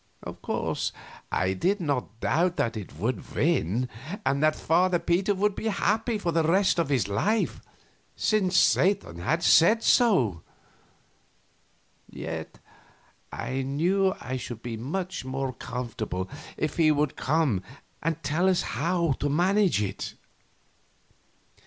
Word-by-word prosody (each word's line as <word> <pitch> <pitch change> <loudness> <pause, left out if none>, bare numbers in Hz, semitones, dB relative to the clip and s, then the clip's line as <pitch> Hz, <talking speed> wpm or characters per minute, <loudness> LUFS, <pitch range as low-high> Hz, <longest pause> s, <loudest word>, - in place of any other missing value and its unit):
Of - - -8
course - - -2 0.4
I 95 +1 +1
did 190 - 0
not 135 - -2
doubt 175 +2 +1
that 115 0 0
it 105 -4 -7
would 115 -1 -3
win, 110 +10 +1 0.4
and 140 - +1
that 155 0 +3
Father 175 +2 +2
Peter 185 +4 +1
would 205 +2 +1
be 220 - -4
happy 220 +2 0
for 175 -4 -1
the 165 0 +2
rest 180 +3 +3
of 165 -4 0
his 130 -9 +1
life, 200 - 0 0.5
since 190 -4 +1
Satan 180 - +3
had 165 - 0
said 215 +9 +5
so; 130 - +3 1.7
yet - - -6 0.7
I 130 +1 -3
knew 180 +8 +1
I 130 +2 -4
should 120 -2 -7
be 120 -2 -4
much 175 - -4
more 130 0 -3
comfortable 115 -7 -4 0.3
if 155 - -2
he 160 -2 +5
would 150 -1 0
come 140 - +1 0.4
and 165 0 -2
tell 160 +6 +2
us 185 - +2
how 170 -2 0
to 145 - 0
manage 180 - +2
it. 95 -1 -5
160 Hz, 135 wpm, -27 LUFS, 125-185 Hz, 1.7 s, said